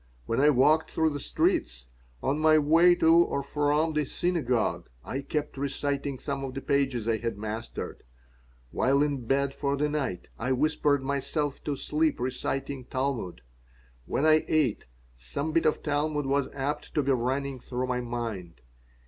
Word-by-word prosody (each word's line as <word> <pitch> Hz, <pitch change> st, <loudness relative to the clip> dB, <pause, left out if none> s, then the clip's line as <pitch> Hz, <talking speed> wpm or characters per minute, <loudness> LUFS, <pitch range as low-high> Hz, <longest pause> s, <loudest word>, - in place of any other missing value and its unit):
When 115 Hz, -, -1 dB
I 145 Hz, +2 st, +6 dB
walked 150 Hz, +4 st, +4 dB
through 160 Hz, -1 st, +1 dB
the 145 Hz, -, -4 dB
streets, -, -, 0 dB, 0.4 s
on 145 Hz, +3 st, 0 dB
my 155 Hz, 0 st, +5 dB
way 165 Hz, +4 st, +5 dB
to 165 Hz, 0 st, +5 dB
or 170 Hz, -5 st, +2 dB
from 150 Hz, +3 st, +1 dB
the 150 Hz, 0 st, +1 dB
synagogue, 140 Hz, -6 st, -1 dB, 0.2 s
I 135 Hz, -, -3 dB
kept 145 Hz, -1 st, -3 dB
reciting 140 Hz, 0 st, -2 dB
some 140 Hz, +1 st, -4 dB
of 130 Hz, -1 st, -5 dB
the 135 Hz, -, -4 dB
pages 135 Hz, -6 st, 0 dB
I 115 Hz, -1 st, +2 dB
had 115 Hz, -3 st, -3 dB
mastered. 110 Hz, +2 st, -5 dB, 0.7 s
While 140 Hz, +2 st, +2 dB
in 140 Hz, -5 st, -2 dB
bed 140 Hz, +1 st, +1 dB
for 140 Hz, 0 st, -1 dB
the 150 Hz, +1 st, +1 dB
night, 135 Hz, -, -3 dB
I 125 Hz, +3 st, 0 dB
whispered 145 Hz, 0 st, +1 dB
myself 140 Hz, +1 st, -2 dB
to 145 Hz, -, -1 dB
sleep 155 Hz, +3 st, 0 dB
reciting 130 Hz, +1 st, -3 dB
Talmud. 130 Hz, -, -3 dB, 0.7 s
When 145 Hz, -, 0 dB
I 155 Hz, 0 st, +5 dB
ate, 150 Hz, -9 st, +1 dB, 0.3 s
some 100 Hz, -, -4 dB
bit 165 Hz, +1 st, +2 dB
of 155 Hz, -, 0 dB
Talmud 150 Hz, 0 st, 0 dB
was 140 Hz, 0 st, +1 dB
apt 140 Hz, +1 st, -4 dB
to 150 Hz, -, +2 dB
be 135 Hz, -, +1 dB
running 130 Hz, +2 st, -1 dB
through 125 Hz, +1 st, -3 dB
my 125 Hz, -1 st, -1 dB
mind. 115 Hz, -, -5 dB
140 Hz, 165 wpm, -28 LUFS, 125-150 Hz, 0.7 s, I